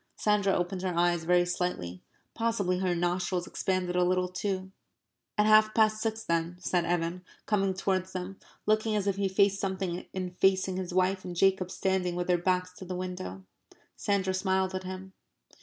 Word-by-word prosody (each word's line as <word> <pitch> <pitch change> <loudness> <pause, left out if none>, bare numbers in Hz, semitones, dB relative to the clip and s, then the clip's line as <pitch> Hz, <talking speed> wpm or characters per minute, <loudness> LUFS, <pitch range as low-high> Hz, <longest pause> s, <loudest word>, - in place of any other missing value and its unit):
Sandra 205 -2 +2
opened 180 +1 -1
her 185 -2 -2
eyes 175 -1 +2
very 175 +1 +4
slightly. 175 - -3 0.3
Possibly 210 -6 0
her 185 -2 +1
nostrils 175 +1 0
expanded 185 -1 -1
a 180 - +4
little 180 0 +2
too. 190 0 -3 0.7
"At 210 - +4
half 215 0 +5
past 215 -1 +3
six 225 0 -2
then," 170 +1 -1
said 180 -1 0
Evan, 175 +1 -1 0.2
coming 195 -3 +1
towards 190 -1 -1
them, 185 +1 -5 0.3
looking 215 +1 +2
as 205 -2 0
if 200 -1 0
he 200 -1 +1
faced 195 +1 +3
something 190 -2 -3
in 185 -1 -4
facing 190 0 +2
his 185 -2 -4
wife 185 +1 +1
and 180 -1 -6
Jacob 190 0 +3
standing 185 -2 0
with 175 0 -1
their 180 -1 +2
backs 180 0 0
to 190 - -8
the 185 0 -4
window. 180 - -5 0.5
Sandra 195 -2 0
smiled 190 0 +1
at 185 0 -4
him. 190 +1 -7
185 Hz, 175 wpm, -29 LUFS, 180-195 Hz, 0.7 s, half